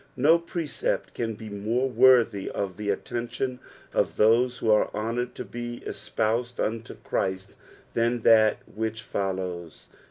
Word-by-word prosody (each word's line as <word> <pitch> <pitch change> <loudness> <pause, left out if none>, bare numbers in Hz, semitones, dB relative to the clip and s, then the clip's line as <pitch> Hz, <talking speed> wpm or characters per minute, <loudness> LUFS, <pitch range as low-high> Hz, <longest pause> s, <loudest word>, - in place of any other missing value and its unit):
Ko 160 +6 +6
precept 170 - -3
can 115 -2 -3
be 110 +1 -9
more 110 +5 -1
worthy 125 -5 +4
of 95 -3 -3
the 105 -1 -3
attention 120 +4 -3 0.3
of - - 0
those 120 +3 +4
who 110 - +1
arc 105 - +3
honoured 115 +3 -2
lobe 120 0 -6
espoused 120 +3 -2
unto 115 +1 -2
Christ 95 +1 -2 0.4
than 115 +1 +1
that 110 -1 +4
which 110 0 -4
follows. 90 -5 -4
115 Hz, 130 wpm, -26 LUFS, 105-125 Hz, 0.4 s, Ko